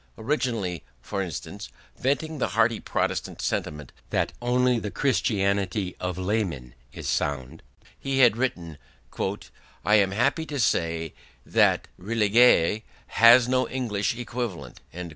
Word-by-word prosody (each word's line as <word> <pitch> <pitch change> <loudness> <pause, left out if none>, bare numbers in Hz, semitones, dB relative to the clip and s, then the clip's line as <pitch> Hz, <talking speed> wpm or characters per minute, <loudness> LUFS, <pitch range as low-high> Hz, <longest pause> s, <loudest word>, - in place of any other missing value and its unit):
Originally, 110 - -2 0.2
for 100 - -4
instance, 90 -7 -6 0.3
venting 150 +3 -1
the - - +1
hearty 115 0 +3
Protestant - - -2
sentiment 75 -3 -3 0.2
that - - -1
only 125 0 +2
the 105 - -4
Christianity 100 -5 0
of 90 -1 -3
laymen 95 - -2 0.2
is - - -7
sound, 65 -3 -2 0.4
he 135 -1 -2
had 120 -5 +6
written: 85 - -3 1.1
"I 105 - +3
am 100 -2 +3
happy 120 - 0
to 145 - -4
say 80 - 0 0.3
that - - +2
'religieux' 105 -1 +3 0.4
has 115 +1 +8
no 130 0 +1
English 115 -2 -2
equivalent". 115 - -5
105 Hz, 120 wpm, -25 LUFS, 90-125 Hz, 1.1 s, has